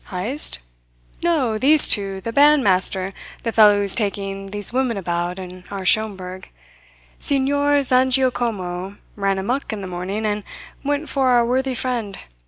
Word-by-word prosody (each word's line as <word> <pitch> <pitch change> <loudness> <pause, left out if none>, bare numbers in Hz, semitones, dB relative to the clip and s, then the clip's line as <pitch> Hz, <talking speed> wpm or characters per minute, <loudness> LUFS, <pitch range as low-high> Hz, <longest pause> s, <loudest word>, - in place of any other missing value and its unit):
"Heyst? 215 +11 +2 0.6
No, 275 -11 0
these 295 +4 +8
two 195 -2 0
the 230 +4 -5
bandmaster, 195 -10 +2 0.3
the 230 - -2
fellow 210 -2 +5
who's 200 -1 +2
taking 195 -2 -4
these 205 +2 -3
women 255 -4 0
about 175 -1 -3
and 185 -1 -9
our 195 -2 -6
Schomberg. 190 -3 -2 0.7
Signor 285 +1 +1
Zangiacomo 240 -8 0 0.2
ran 195 -1 -1
amuck 240 +9 -3
in 215 -2 -5
the 190 - -6
morning, 185 +4 -4
and 210 -1 -2 0.4
went 290 +2 -2
for 270 -2 0
our 240 -2 +3
worthy 260 +2 -1
friend. 235 -6 -3
215 Hz, 140 wpm, -20 LUFS, 195-260 Hz, 0.7 s, these